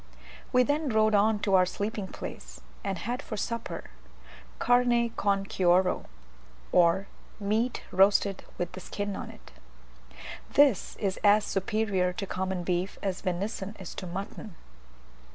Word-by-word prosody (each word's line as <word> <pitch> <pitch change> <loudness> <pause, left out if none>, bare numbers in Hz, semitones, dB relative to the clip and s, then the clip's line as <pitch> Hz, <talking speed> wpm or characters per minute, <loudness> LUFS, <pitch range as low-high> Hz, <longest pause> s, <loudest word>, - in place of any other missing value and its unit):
We 250 -1 +5
then 290 +2 0
rode 215 -1 +3
on 210 +1 +4
to 195 - 0
our 185 -1 +6
sleeping 205 +1 -3
place, - - -8 0.2
and 195 -2 -2
had 240 +9 -3
for 215 - -6
supper 230 +2 -4 0.7
"carne 245 -1 +3
con 200 -3 0
cuero," 180 -1 +2 0.7
or 175 +2 +4 0.3
meat 220 +4 0
roasted 195 +1 +3
with 175 -1 -2
the 185 - -8
skin 205 +2 -4
on - - -6
it. - - -14 1.0
This 280 -8 +4
is 195 -2 -2
as 210 0 +5
superior 195 -2 0
to 195 - -4
common 190 -1 -2
beef 180 +2 -1
as 190 -2 -2
venison 195 +3 -3
is 190 - -7
to 185 - -6
mutton. 195 +1 -6
200 Hz, 135 wpm, -28 LUFS, 185-220 Hz, 1.0 s, our